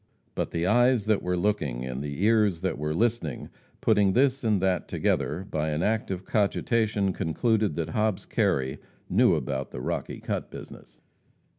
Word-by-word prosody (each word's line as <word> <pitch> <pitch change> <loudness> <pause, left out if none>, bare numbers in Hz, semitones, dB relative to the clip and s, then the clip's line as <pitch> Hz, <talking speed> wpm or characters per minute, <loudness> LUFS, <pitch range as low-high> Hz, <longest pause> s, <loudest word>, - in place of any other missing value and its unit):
But - - -2
the 85 0 -2
eyes 120 +2 +3
that 110 -2 +2
were 90 0 -1
looking, 80 - -1
and 65 +1 -4
the 75 +5 -4
ears 105 -6 +3
that 95 -6 -2
were 75 +1 -2
listening, 110 - -1 0.3
putting 100 -2 +3
this 135 +2 +2
and 110 -4 +2
that 95 -2 0
together 85 +6 -1
by 80 0 -1
an 75 +3 -1
act 110 0 0
of 95 -1 -4
cogitation, 105 -1 +1
concluded 105 +3 0
that 85 -2 -2
Hobbs 105 -3 0
Kerry 65 +1 0 0.3
knew - - +5
about 70 -1 -3
the 65 - -7
Rocky - - -4
Cut - - -4
business. - - -11
95 Hz, 165 wpm, -27 LUFS, 75-110 Hz, 0.3 s, knew